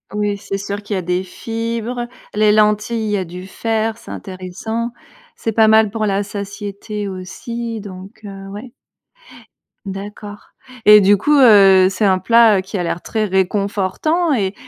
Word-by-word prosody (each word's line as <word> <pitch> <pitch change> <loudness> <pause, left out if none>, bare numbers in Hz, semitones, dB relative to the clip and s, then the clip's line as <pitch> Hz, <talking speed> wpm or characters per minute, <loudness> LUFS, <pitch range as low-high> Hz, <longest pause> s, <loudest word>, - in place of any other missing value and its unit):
Oui, 205 -1 -1
c'est 195 0 -5
sûr 200 +1 -5
qu'il 205 0 -4
y - - 0
a 185 - -3
des 180 +2 -1
fibres, 230 +4 -4 0.3
les 210 0 +3
lentilles, 210 +2 +2
il - - -2
y 205 - +1
a 185 - -3
du 180 +2 -9
fer, 220 +2 -2
c'est - - -14
intéressant. 195 +5 -5 0.5
C'est 225 - -3
pas 220 0 +4
mal 220 -1 +4
pour 215 -1 -1
la 200 0 0
satiété 205 0 -6
aussi 225 +5 -6
donc, 195 +1 -11
heu, 195 -1 -9
ouais. 215 +5 -9 1.1
D'accord. 205 +1 -8 0.4
Et 210 0 +9
du 200 +1 +5
coup, 295 +8 +2
heu, 195 -6 +7
c'est 195 +2 -1
un 190 -1 +3
plat, 230 -1 +5
heu, - - -1
qui 190 +2 -6
a 180 - -1
l'air 170 0 -3
très 220 -1 -2
réconfortant 200 - 0
et 200 -6 0
205 Hz, 170 wpm, -18 LUFS, 195-225 Hz, 1.1 s, Et